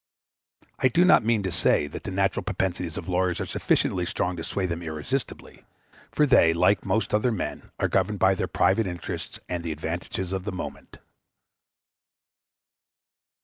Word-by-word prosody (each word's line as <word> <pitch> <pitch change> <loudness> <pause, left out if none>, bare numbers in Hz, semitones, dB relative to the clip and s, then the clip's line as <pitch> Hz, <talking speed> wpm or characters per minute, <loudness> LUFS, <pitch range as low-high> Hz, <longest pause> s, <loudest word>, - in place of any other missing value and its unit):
I - - +4
do 170 +8 +4
not 180 - +6
mean 110 -2 +1
to 95 - -2
say 75 - +2
that 75 - -8
the - - -3
natural - - 0
propensities 90 -3 -2
of 85 - -6
lawyers 90 -1 0
are - - -2
sufficiently 90 - 0
strong 90 0 -1
to 80 - -6
sway 95 +2 -2
them 85 -1 -3
irresistibly; 80 - -5 0.5
for 150 - +3
they, 85 - +5
like 90 +4 +3
most 110 - 0
other 105 +4 +2
men, 110 - -4
are - - +2
governed - - 0
by - - +4
their - - -2
private 115 -3 +2
interests 90 -3 -6
and 90 -1 -3
the 85 - -3
advantages 85 +4 -4
of 95 -1 -2
the 105 - -3
moment. 90 - -7
90 Hz, 165 wpm, -26 LUFS, 85-105 Hz, 0.5 s, not